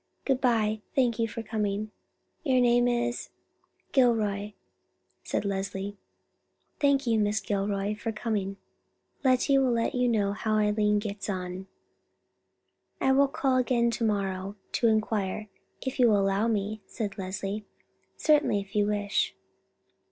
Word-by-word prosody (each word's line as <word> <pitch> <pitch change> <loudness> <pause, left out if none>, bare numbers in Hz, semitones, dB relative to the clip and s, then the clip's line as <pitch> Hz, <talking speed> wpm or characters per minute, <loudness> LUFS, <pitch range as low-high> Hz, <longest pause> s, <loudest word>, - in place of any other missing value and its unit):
Good 265 -2 +1
by; 220 -4 +2
thank 245 -4 +2
you 225 - +2
for 225 +1 -6
coming. 210 -1 -2 0.5
Your 260 -5 +3
name 245 0 +4
is——" 240 0 -1 0.6
"Gilroy," 215 -6 +2 0.7
said - - -2
Leslie. 195 0 -3 0.8
"Thank 280 -1 +3
you, 225 -2 +2
Miss 210 +1 +1
Gilroy, 200 0 -1
for 215 +2 -4
coming. 210 -3 -2 0.7
Lettie 265 +1 +4
will 260 -2 +2
let 230 -1 0
you 250 0 +2
know 210 -4 +2
how 215 +1 -1
Eileen 210 0 +2
gets 205 -1 -4
on." 185 0 -4 1.3
"I 265 - +3
will 275 +1 +5
call 270 -1 +1
again 240 -2 +2
to 230 +1 -3
morrow 195 -4 0
morning 195 +2 -7 0.2
to 235 - +2
inquire, 215 -2 0 0.4
if 260 +1 -3
you 245 - +6
will 210 -3 +4
allow 195 +3 +2
me," 215 -1 -1
said 210 -2 -4
Leslie. 195 +2 -4 0.5
"Certainly, 300 -9 +3
if 200 +1 -9
you 205 -1 +3
wish." 205 -1 0
215 Hz, 140 wpm, -28 LUFS, 200-240 Hz, 1.3 s, you